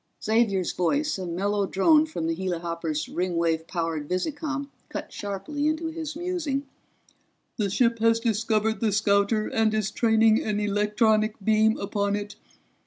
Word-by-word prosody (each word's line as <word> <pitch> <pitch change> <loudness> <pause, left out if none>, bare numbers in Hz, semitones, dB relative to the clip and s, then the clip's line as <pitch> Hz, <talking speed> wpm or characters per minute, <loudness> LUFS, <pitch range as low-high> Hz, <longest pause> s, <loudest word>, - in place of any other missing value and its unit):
Xavier's 215 -5 +2
voice, 285 - 0
a 185 - -4
mellow 200 +3 -1
drone 305 - +4
from 240 - -4
the 165 - 0
helihopper's 170 -3 -3
Ringwave 170 -2 -1
powered 165 -4 -3
visicom, 285 - -2 0.2
cut - - -6
sharply 205 +10 -3
into 315 +1 -1
his 320 -2 -5
musing. 330 -5 -2 0.9
"The 205 -4 0
ship 230 +3 +2
has 230 0 +3
discovered 220 -1 0
the 220 -2 +1
scouter 205 +1 +2
and 225 -1 +1
is 215 -1 -1
training 220 -1 +3
an 210 -1 -1
electronic 210 +1 +2
beam 220 +1 +3
upon 200 0 -1
it. 205 0 -5
215 Hz, 140 wpm, -26 LUFS, 190-235 Hz, 0.9 s, drone